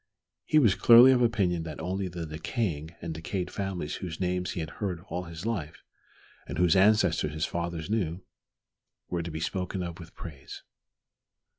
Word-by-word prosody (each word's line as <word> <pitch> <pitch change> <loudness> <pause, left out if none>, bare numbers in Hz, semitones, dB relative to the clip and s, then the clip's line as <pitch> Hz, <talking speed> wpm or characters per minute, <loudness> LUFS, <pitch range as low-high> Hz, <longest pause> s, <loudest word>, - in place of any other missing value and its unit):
He 155 - +3
was 115 -10 +6
clearly 120 +6 +8
of 125 -1 +3
opinion 100 -8 +2
that 80 -2 -7
only 95 +3 -2
the 85 -2 -5
decaying 80 - -3
and 85 -1 -3
decayed 85 +3 -4
families 95 -6 -3
whose 85 -4 -6
names 90 -1 -1
he - - -4
had 80 0 -4
heard 95 -5 -1
all 90 +1 -3
his 85 +2 -8
life, 95 -10 -3 0.6
and - - -5
whose 90 -1 +4
ancestors 95 -6 +4
his 75 -1 -1
fathers 85 -2 -3
knew, 95 -4 -1 0.9
were 85 -1 -1
to 85 - -5
be 80 0 -5
spoken 90 +2 -2
of 85 -1 -6
with 85 -1 -12
praise. 70 -5 -9
90 Hz, 170 wpm, -28 LUFS, 80-95 Hz, 0.9 s, clearly